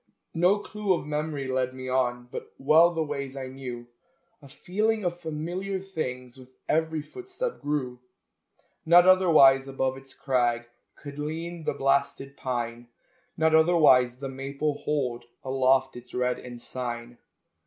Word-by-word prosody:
No 180 +5 +3
clue 205 -1 -1
of 170 - -5
memory 150 -2 -3
led 130 0 -1
me 130 0 -7
on, 125 -1 0
But - - -8
well 155 +5 +5
the 165 -2 -1
ways 140 -2 -5
I 135 - -4
knew; 125 -2 -7 0.6
A 140 - -14
feeling 210 +8 -1
of 175 -1 -1
familiar 175 +5 -4
things 130 -9 -6
With 130 0 -14 0.2
every 160 -1 0
footstep 385 - -6
grew. 135 -4 -2 0.8
Not 175 +2 +7
otherwise 155 -8 +6
above 135 -1 -1
its 135 0 -15
crag 120 -3 0 0.3
Could 145 0 -10
lean 165 +2 -5
the - - 0
blasted 135 0 0
pine; 120 -2 -4 0.5
Not 160 0 +3
otherwise 155 -7 +5
the 135 +1 -5
maple 140 +2 -3
hold 125 -5 -2 0.2
Aloft 130 0 +2
its 125 0 -11
red 125 0 0
ensign. 120 -1 -7
140 Hz, 140 wpm, -27 LUFS, 130-160 Hz, 0.8 s, Not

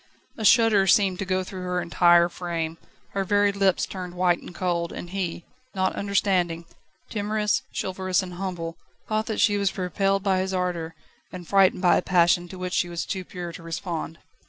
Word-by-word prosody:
A 220 - -6
shudder 215 -3 +5
seemed 190 -1 +3
to 195 - -2
go 185 0 0
through 185 0 -8
her 180 0 -1
entire 175 0 +4
frame, 170 -2 -4 0.3
her 195 - -2
very 205 +1 +3
lips 195 -2 +2
turned 180 -2 -7
white 175 -1 +2
and 175 - -12
cold, 170 -2 -1
and 175 - -8
he, 180 -3 -3 0.3
not 190 0 0
understanding, 185 -4 0 0.5
timorous, 210 0 0 0.2
chivalrous 185 -1 0
and 180 -1 -8
humble, 175 -3 -5 0.3
thought 215 0 -1
that 220 - -2
she 205 -1 +4
was 200 0 -1
repelled 195 +1 0
by 190 -2 +2
his 190 0 -2
ardour 170 -3 -2 0.4
and 180 -2 -9
frightened 195 0 +3
by 175 - +5
a - - +1
passion 175 -1 +3
to 185 - -10
which 180 0 -4
she 175 - +1
was 170 -1 -3
too 190 -1 -4
pure 175 -1 -7
to 165 - -10
respond. 165 0 -5
185 Hz, 185 wpm, -25 LUFS, 175-195 Hz, 0.5 s, shudder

